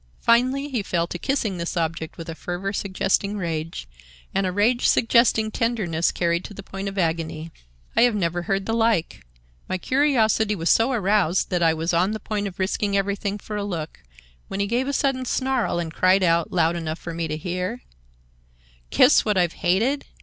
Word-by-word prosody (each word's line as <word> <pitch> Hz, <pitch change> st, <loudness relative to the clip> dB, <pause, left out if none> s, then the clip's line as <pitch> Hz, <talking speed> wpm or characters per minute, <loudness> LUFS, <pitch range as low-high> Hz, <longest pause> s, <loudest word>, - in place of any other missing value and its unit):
Finally 255 Hz, +4 st, +2 dB
he 250 Hz, -6 st, -1 dB
fell 170 Hz, -4 st, -1 dB
to 175 Hz, 0 st, -6 dB
kissing 220 Hz, -8 st, -1 dB
this 170 Hz, +1 st, -3 dB
object 165 Hz, 0 st, -3 dB
with 165 Hz, -, -8 dB
a 165 Hz, -, -4 dB
fervor 180 Hz, +4 st, -4 dB
suggesting 200 Hz, +1 st, 0 dB
rage, 165 Hz, -, -4 dB, 0.5 s
and 195 Hz, -1 st, +1 dB
a -, -, -1 dB
rage 225 Hz, +6 st, +2 dB
suggesting 230 Hz, -2 st, +3 dB
tenderness 210 Hz, -9 st, 0 dB
carried 170 Hz, 0 st, 0 dB
to 205 Hz, -, -9 dB
the 195 Hz, -, -8 dB
point 195 Hz, +1 st, -5 dB
of 195 Hz, -, -10 dB
agony. 165 Hz, -2 st, -2 dB, 0.4 s
I -, -, +4 dB
have 240 Hz, -2 st, +4 dB
never 175 Hz, -3 st, -1 dB
heard 195 Hz, +2 st, -1 dB
the 225 Hz, -, -1 dB
like; 225 Hz, -, +1 dB, 0.5 s
my 185 Hz, -, 0 dB
curiosity 220 Hz, -4 st, +2 dB
was 165 Hz, -2 st, +1 dB
so 230 Hz, +4 st, +3 dB
aroused 200 Hz, -6 st, +1 dB
that 180 Hz, -1 st, +1 dB
I 165 Hz, -1 st, +3 dB
was 165 Hz, +2 st, -1 dB
on 180 Hz, +5 st, +2 dB
the 220 Hz, -, -4 dB
point 210 Hz, -2 st, -3 dB
of 185 Hz, -, -9 dB
risking 200 Hz, +1 st, 0 dB
everything 200 Hz, +1 st, -1 dB
for 210 Hz, +1 st, -7 dB
a 205 Hz, -, -2 dB
look, 165 Hz, -6 st, -5 dB, 0.5 s
when 195 Hz, -, -5 dB
he 200 Hz, -, +1 dB
gave 240 Hz, +5 st, 0 dB
a -, -, 0 dB
sudden 270 Hz, -2 st, 0 dB
snarl 260 Hz, -5 st, 0 dB
and 165 Hz, -2 st, -3 dB
cried 185 Hz, +2 st, +3 dB
out, 170 Hz, -1 st, +2 dB
loud 170 Hz, -1 st, +2 dB
enough 160 Hz, -2 st, -3 dB
for 170 Hz, -, -7 dB
me 165 Hz, 0 st, -2 dB
to 155 Hz, 0 st, -3 dB
hear: 180 Hz, +8 st, -4 dB, 1.1 s
'Kiss 250 Hz, -, +5 dB
what 210 Hz, -2 st, 0 dB
I've 175 Hz, -2 st, +2 dB
hated? 230 Hz, +11 st, 0 dB
195 Hz, 195 wpm, -23 LUFS, 170-220 Hz, 1.1 s, Kiss